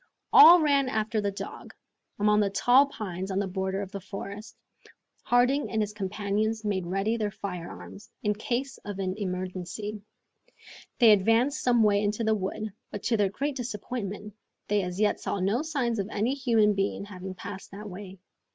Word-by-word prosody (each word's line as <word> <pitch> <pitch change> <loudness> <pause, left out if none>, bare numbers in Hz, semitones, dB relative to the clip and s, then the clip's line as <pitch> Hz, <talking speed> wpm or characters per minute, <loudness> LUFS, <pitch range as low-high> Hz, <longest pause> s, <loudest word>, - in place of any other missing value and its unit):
All 355 -4 +10
ran 280 -4 +2
after 220 -1 -1
the 205 - 0
dog, 200 - -8 0.4
among 210 +1 +3
the 205 -1 +2
tall 250 +7 +5
pines 190 -7 -5
on 190 - -2
the 200 - +1
border 190 +1 -2
of 190 - -9
the 200 - -5
forest. 200 +2 -8 0.7
Harding 250 +4 +2
and 220 - -1
his 210 -1 -1
companions 210 +2 -2
made 190 -4 -1
ready 195 +5 0
their 210 -2 -1
firearms, 195 +1 -8
in 210 -1 +2
case 245 +5 -3
of 205 -2 -7
an 190 -1 -2
emergency. 185 +2 -4 1.0
They 230 -3 +7
advanced 225 +8 +3
some 240 -2 +3
way 205 -1 +3
into 210 +2 -1
the 220 0 +2
wood, 210 +1 -3 0.2
but 205 - -7
to 230 - +1
their 205 -2 +2
great 280 +8 -3
disappointment, 210 -4 -5 0.3
they 205 0 +2
as 180 0 -5
yet 210 -1 +2
saw 200 - -3
no 200 +8 +1
signs 270 -8 -1
of 200 +1 -2
any 220 +5 0
human 230 -6 +3
being 195 0 -1
having 190 -2 -8
passed 190 +1 -8
that 205 +2 -9
way. 190 0 -9
210 Hz, 175 wpm, -27 LUFS, 195-230 Hz, 1.0 s, All